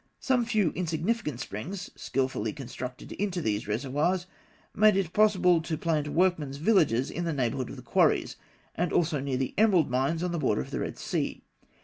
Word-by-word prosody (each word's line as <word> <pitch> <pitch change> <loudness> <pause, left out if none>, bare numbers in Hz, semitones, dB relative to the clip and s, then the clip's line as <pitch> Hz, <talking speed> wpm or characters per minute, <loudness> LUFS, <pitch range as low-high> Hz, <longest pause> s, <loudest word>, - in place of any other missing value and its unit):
Some 250 -3 +1
few 215 -7 +2
insignificant 170 - -2
springs, 175 - -6
skilfully 130 -5 -2
conducted 125 -2 -7
into 195 -3 -2
these 105 -9 -1
reservoirs, 145 - 0 0.5
made 210 0 +5
it 180 -4 -1
possible 185 -5 +4
to 160 -1 -3
plant 155 -3 0
workmen's 160 -4 +1
villages 150 - +2
in 175 - -3
the 165 -1 -1
neighbourhood 130 -2 -1
of - - -7
the - - -11
quarries, - - +2 0.4
and 175 +1 -1
also 160 -3 +1
near 135 -1 -2
the 130 -1 -2
emerald 185 - +4
mines 135 +7 0
on 180 - -1
the 170 - -2
borders 65 - +1
of - - -14
the - - -2
Red - - -4
Sea. - - -3
160 Hz, 175 wpm, -28 LUFS, 130-185 Hz, 0.5 s, made